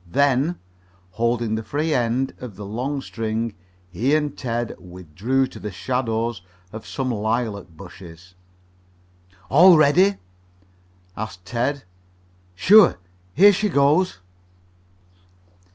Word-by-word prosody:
Then, 140 Hz, -, +1 dB, 0.6 s
holding 115 Hz, +2 st, -1 dB
the 110 Hz, -, -2 dB
free 150 Hz, +8 st, -2 dB
end 125 Hz, +1 st, 0 dB
of 120 Hz, -6 st, -9 dB
the 100 Hz, +1 st, -8 dB
long 130 Hz, +7 st, -3 dB
string, 115 Hz, 0 st, -3 dB, 0.4 s
he 125 Hz, -, +1 dB
and 150 Hz, -2 st, -1 dB
Ted 120 Hz, -2 st, -3 dB
withdrew 90 Hz, +9 st, -2 dB
to -, -, -11 dB
the 105 Hz, -, -5 dB
shadow 115 Hz, +2 st, -2 dB, 0.4 s
of 110 Hz, 0 st, -9 dB
some 130 Hz, -2 st, -3 dB
lilac 110 Hz, -3 st, -2 dB
bushes. 85 Hz, 0 st, -13 dB, 1.2 s
"All 175 Hz, +4 st, +7 dB
ready?" 175 Hz, +7 st, +4 dB, 1.0 s
asked 95 Hz, -5 st, -7 dB
Ted. 125 Hz, +8 st, -2 dB, 0.7 s
"Sure. 180 Hz, -, +6 dB, 0.4 s
Here 200 Hz, +5 st, +7 dB
she 210 Hz, +3 st, 0 dB
goes!" 150 Hz, -, +2 dB
120 Hz, 105 wpm, -22 LUFS, 105-140 Hz, 1.2 s, All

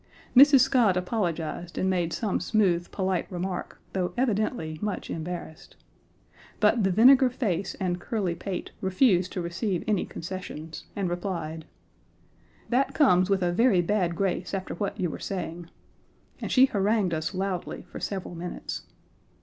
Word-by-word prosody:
Mrs. 275 Hz, +1 st, +9 dB
Scott 235 Hz, -7 st, +4 dB
apologized 175 Hz, -3 st, -2 dB
and 190 Hz, -, +1 dB
made 175 Hz, -3 st, 0 dB
some 210 Hz, +1 st, -1 dB
smooth, 180 Hz, -6 st, +1 dB
polite 190 Hz, -2 st, -2 dB
remark, 180 Hz, 0 st, -4 dB
though 180 Hz, -2 st, -2 dB
evidently 215 Hz, -9 st, -1 dB
much 210 Hz, -2 st, -3 dB
embarrassed. 170 Hz, +1 st, -6 dB, 0.8 s
But 230 Hz, -, +3 dB
the 190 Hz, -, +3 dB
vinegar 255 Hz, +7 st, +6 dB
face 200 Hz, -7 st, -2 dB
and 180 Hz, -2 st, -1 dB
curly 195 Hz, -4 st, -1 dB
pate 180 Hz, +1 st, -5 dB
refused 185 Hz, -1 st, +3 dB
to 180 Hz, -, -2 dB
receive 180 Hz, +2 st, -2 dB
any 210 Hz, -4 st, +1 dB
concessions, 165 Hz, -3 st, -7 dB
and 195 Hz, -2 st, -1 dB
replied: 170 Hz, -3 st, -4 dB, 1.0 s
"That 255 Hz, +3 st, +1 dB
comes 185 Hz, -, +4 dB
with 195 Hz, -2 st, +2 dB
a 175 Hz, -, +2 dB
very 195 Hz, -3 st, +4 dB
bad 180 Hz, -2 st, 0 dB
grace 195 Hz, +1 st, -1 dB
after 190 Hz, -1 st, -4 dB
what 200 Hz, +3 st, -3 dB
you 175 Hz, -3 st, 0 dB
were -, -, -7 dB
saying," 175 Hz, -2 st, -5 dB, 0.7 s
and -, -, -4 dB
she 260 Hz, 0 st, +7 dB
harangued 205 Hz, -5 st, +1 dB
us 160 Hz, +4 st, -2 dB
loudly 190 Hz, -1 st, -3 dB
for -, -, -10 dB
several 190 Hz, -3 st, -4 dB
minutes. 175 Hz, +1 st, -6 dB
185 Hz, 145 wpm, -27 LUFS, 175-210 Hz, 1.0 s, Mrs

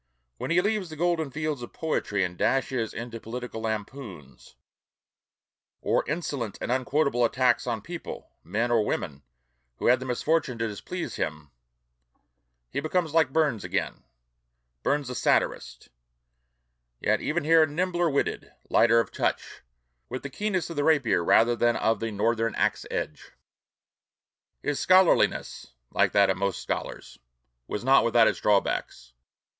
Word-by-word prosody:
When -, -, -5 dB
he 170 Hz, +1 st, +4 dB
leaves 205 Hz, -2 st, -1 dB
the 155 Hz, -, -8 dB
golden 165 Hz, -2 st, 0 dB
fields 150 Hz, -1 st, -3 dB
of 120 Hz, -, -9 dB
poetry 105 Hz, -11 st, -1 dB
and 90 Hz, 0 st, -3 dB
dashes 130 Hz, 0 st, 0 dB
into 115 Hz, 0 st, -6 dB
political 120 Hz, 0 st, -6 dB
lampoons, 105 Hz, -, -6 dB, 1.2 s
or -, -, +1 dB
insolent 140 Hz, -, -3 dB
and -, -, -3 dB
unquotable 130 Hz, 0 st, +1 dB
attacks 125 Hz, +1 st, +2 dB
on 115 Hz, -4 st, -2 dB
people 170 Hz, 0 st, -8 dB
(men 110 Hz, +7 st, -1 dB
or 115 Hz, -2 st, +3 dB
women) 70 Hz, -8 st, -3 dB, 0.6 s
who -, -, -5 dB
had 125 Hz, +1 st, +5 dB
the 130 Hz, -, -6 dB
misfortune 130 Hz, +1 st, 0 dB
to 115 Hz, 0 st, -1 dB
displease 165 Hz, -, -5 dB
him, 75 Hz, -2 st, -4 dB, 1.2 s
he -, -, -2 dB
becomes 160 Hz, -1 st, -1 dB
like 160 Hz, -4 st, +3 dB
Burns 145 Hz, -8 st, +1 dB
again, -, -, -3 dB, 0.8 s
Burns 145 Hz, -1 st, 0 dB
the 125 Hz, -, -4 dB
satirist; -, -, 0 dB, 1.1 s
yet -, -, +1 dB
even 160 Hz, +1 st, -1 dB
here 160 Hz, +1 st, +5 dB
nimbler 175 Hz, +2 st, 0 dB
witted, 140 Hz, -1 st, -2 dB, 0.2 s
lighter 115 Hz, 0 st, +5 dB
of 115 Hz, -, -1 dB
touch, -, -, -2 dB, 0.5 s
with 130 Hz, +1 st, -5 dB
the 140 Hz, -, -6 dB
keenness 190 Hz, -1 st, -2 dB
of 165 Hz, -, -7 dB
the 145 Hz, -, +1 dB
rapier 140 Hz, -, +3 dB
rather 115 Hz, +7 st, +4 dB
than 120 Hz, 0 st, +2 dB
of 110 Hz, -1 st, +1 dB
the 115 Hz, -, -2 dB
Northern 115 Hz, +2 st, 0 dB
axe -, -, 0 dB
edge. 75 Hz, -, -5 dB, 1.3 s
His 145 Hz, -1 st, -1 dB
scholarliness 185 Hz, -1 st, +3 dB, 0.2 s
like -, -, +2 dB
that 100 Hz, -1 st, +5 dB
of -, -, -2 dB
most 100 Hz, -3 st, -1 dB
scholars -, -, -5 dB, 0.5 s
was 105 Hz, -, -4 dB
not 135 Hz, +2 st, +5 dB
without 115 Hz, -1 st, +4 dB
its -, -, 0 dB
drawbacks. 100 Hz, -10 st, 0 dB
125 Hz, 145 wpm, -27 LUFS, 110-155 Hz, 1.3 s, had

